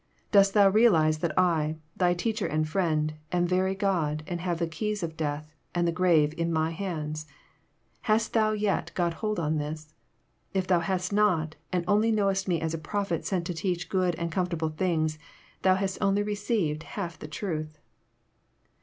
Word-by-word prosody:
Dost 200 -1 +5
thou 200 -1 +7
realize 180 -8 +4
that 160 -1 -2
I, 160 -4 +2 0.2
thy 175 -1 +2
Teacher 215 +3 -1
and 155 0 0
Friend, 155 -3 0 0.2
am 175 0 +2
very 185 +2 +1
God, 165 -7 0
and 175 0 -4
have 175 -2 -1
the 170 - 0
keys 205 +5 -3
of 160 -1 -4
death 150 0 -3 0.2
and 175 0 +2
the - - +2
grave 165 -4 +3
in 165 0 0
my 160 0 +1
hands? 155 -4 -4 0.8
Hast 220 +1 +2
thou 215 -1 +3
yet 205 -5 0
got 170 -2 +1
hold 215 -3 -1
of 155 -1 0
this? 155 +1 -6 0.6
If 190 -1 +1
thou 180 -1 +3
hast 185 +2 -1
not, 175 -7 +2 0.2
and 180 -2 0
only 210 +3 +3
knowest 195 -3 +1
me 175 -3 +1
as 160 0 -2
a 165 - -3
prophet 185 +1 -2
sent 180 -3 -1
to 175 - -2
teach 175 +1 -2
good 185 -3 +1
and 170 +1 -3
comfortable 170 -2 -1
things, 155 -2 0 0.4
thou 185 -1 +4
hast 190 0 -2
only 200 0 +2
received 205 -7 -1
half 175 -1 -6
the - - -7
truth." 155 -2 -4
175 Hz, 180 wpm, -28 LUFS, 155-195 Hz, 0.8 s, thou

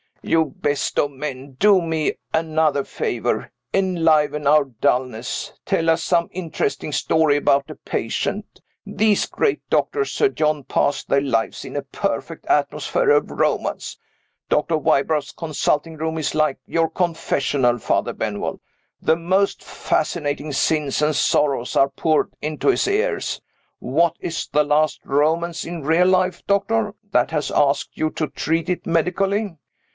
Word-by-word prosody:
"You 160 -1 +2
best 145 -1 -1
of 145 - +1
men! 135 -1 -6
Do 200 -2 +5
me 160 -2 -1 0.2
another 160 -3 +1
favor. - - -2 0.2
Enliven 160 -6 +2
our 150 0 +5
dullness. 125 -1 -2
Tell 165 0 +2
us 160 0 0
some 170 -1 +2
interesting 165 -4 -3
story 155 0 +2
about 140 -1 +2
a - - -7
patient. - - -3 0.2
These 215 -2 +2
great 430 - -1
doctors, 420 -1 +1
Sir 420 - +2
John, 150 - 0
pass 145 - 0
their 140 - +2
lives 115 -5 -1
in - - -8
a - - -1
perfect - - -4
atmosphere - - +1
of - - +3
romance. - - -1 0.5
Dr. 155 +2 +2
Wybrow's 145 0 +1
consulting 160 0 -1
room 160 +1 -2
is 155 - -1
like 155 -3 +1
your 165 -1 +1
confessional, 145 -7 0
Father - - 0
Benwell. 105 -2 -3 0.4
The 160 - +3
most 185 +4 0
fascinating 150 -2 -2
sins 145 0 0
and 150 0 +2
sorrows 140 -4 +1
are 135 - +4
poured 155 +3 +1
into 155 - -1
his 390 - +2
ears. 430 +5 -1 0.4
What 160 +6 +1
is 165 -1 -4
the 150 +1 +4
last 150 +1 +1
romance 160 +3 0
in 170 -2 -6
real 165 +5 +3
life, 185 0 +1
doctor, 210 +1 +1 0.2
that - - +3
has 150 -2 -1
asked 140 -1 +1
you 155 - +1
to 155 - -2
treat 165 +3 -2
it 180 - -2
medically? 190 +3 0
155 Hz, 140 wpm, -21 LUFS, 145-170 Hz, 0.5 s, Do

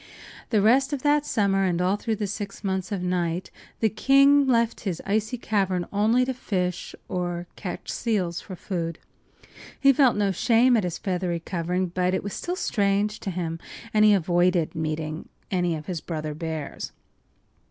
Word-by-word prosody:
The 215 -4 +2
rest 265 +6 +4
of 275 - -3
that 295 0 +3
summer 195 -2 +2
and 180 -2 +1
all 185 +2 +2
through 220 +1 -2
the 210 - -2
six 200 0 -6
months 190 +1 -2
of 195 -3 -2
night 180 -1 -1 0.3
the 220 - +5
king 275 +5 +5
left 235 -2 +2
his 185 -6 -3
icy 215 +4 0
cavern 190 -6 0
only 225 +5 +3
to 260 - -2
fish 180 -7 -3
or 175 -1 -3
catch 185 - -6
seals 190 -8 -1
for 185 - -8
food. 170 -3 -4 0.8
He 275 0 +6
felt 260 -2 +4
no 200 -1 +2
shame 240 +6 +4
at 220 - +2
his 175 -2 -3
feathery 180 -2 -2
covering, 180 +2 -2
but 180 +1 0
it - - -2
was 200 - -5
still 355 - -3
strange 205 - 0
to - - -4
him, 170 -2 -3 0.3
and 215 0 +5
he 210 -1 +7
avoided 175 -1 +2
meeting 155 -1 -3 0.2
any 175 -3 +1
of 155 -1 -7
his 170 -3 -4
brother 155 -2 -4
bears. 160 -1 -5
190 Hz, 175 wpm, -25 LUFS, 175-220 Hz, 0.8 s, he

